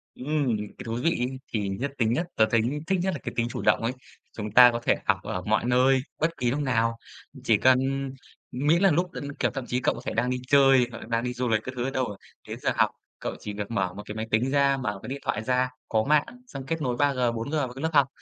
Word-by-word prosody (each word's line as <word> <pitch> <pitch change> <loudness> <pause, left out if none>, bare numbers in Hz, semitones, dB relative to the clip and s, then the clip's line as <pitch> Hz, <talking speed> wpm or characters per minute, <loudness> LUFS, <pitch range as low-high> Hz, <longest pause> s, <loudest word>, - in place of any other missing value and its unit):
Ừm. 135 -4 0
Cái 105 0 -8
thú 115 +1 -3
vị 165 - +4
ấy 130 +2 -2
thì 105 -3 -1
nhất 125 +9 -3
tính 115 -2 +2
nhất, 165 +8 0
tớ 110 - +5
thấy 115 - +4 0.3
thích 190 -1 +1
nhất 190 +1 0
là 155 - -5
cái - - -5
tính 115 0 +1
chủ - - -5
động - - +3
ấy. 115 - +1 0.5
Chúng 105 -1 -4
ta 125 +2 +8
có 115 - -2
thể - - +3
học 100 -3 +3
ở 90 - -3
mọi 110 +5 0
nơi, 130 +2 +4 0.2
bất 165 +1 0
kỳ 125 -3 0
lúc 140 - -1
nào. 115 -4 +1 0.5
Chỉ 115 -5 +4
cần 130 +3 +5 0.7
ừm, 135 +4 -3
miễn 170 +4 +4
là 195 - +5
lúc 175 +4 0
đ - - -9 0.2
kiểu, - - +1
thậm 135 -3 -4
chí 125 - 0
cậu - - +1
có - - -8
thể - - -2
đang 120 +2 0
đi 125 - 0
chơi 135 -3 +5
hoặc 115 - -7
là - - -9
đang 115 +1 0
đi 125 - -2
du 125 +1 -2
lịch 110 -1 +1
các 130 - -5
thứ 120 - -2
ở 130 - -1
đâu, 125 -7 -2 0.3
đến - - -6
giờ - - +1
học, - - +3 0.3
cậu - - -4
chỉ 105 - -6
việc 100 +2 -5
mở 95 -5 -1
một 105 +2 -8
cái 105 - -7
máy 110 0 -4
tính 120 +5 +2
ra, 140 -1 +3
mở 105 -7 -3
cái 110 - -7
điện 140 - -4
thoại 120 -3 -1
ra, 125 +2 +1 0.2
có 110 -1 +2
mạng, 150 +3 +3 0.2
xong 135 - -8
kết 165 +2 -2
nối 125 -3 0
3G, 125 -4 +2
4G 115 +3 -4
vào 135 -5 -1
cái 135 - -8
lớp 160 - 0
học, 140 -3 +5
125 Hz, 280 wpm, -26 LUFS, 115-140 Hz, 0.7 s, ta